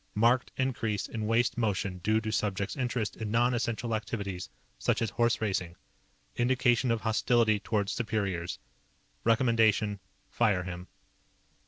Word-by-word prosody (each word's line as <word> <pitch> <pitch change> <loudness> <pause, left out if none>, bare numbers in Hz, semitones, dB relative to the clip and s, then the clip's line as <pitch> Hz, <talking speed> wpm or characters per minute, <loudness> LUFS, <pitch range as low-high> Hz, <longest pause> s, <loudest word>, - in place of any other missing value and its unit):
Marked 120 +4 +3
increase 115 -6 -1
in 110 -2 -4
waste 115 +2 +2
motion 100 -4 -1
due 110 +5 +2
to 110 -1 -3
subject's 100 -1 -1
interest 125 -5 -2
in 110 -1 -4
non 120 +3 +3
essential 120 -1 -1
activities 100 -4 -4 0.3
such - - +1
as 110 -3 -1
horseracing. 105 -7 0 0.6
Indication 120 0 +2
of 115 -1 +1
hostility 110 -1 +2
towards 100 -1 -1
superiors._ 100 -7 -2 0.7
"_Recommendation: 110 -3 +3 0.3
Fire 105 -6 +1
him. 90 0 -7
110 Hz, 125 wpm, -29 LUFS, 100-120 Hz, 0.7 s, Marked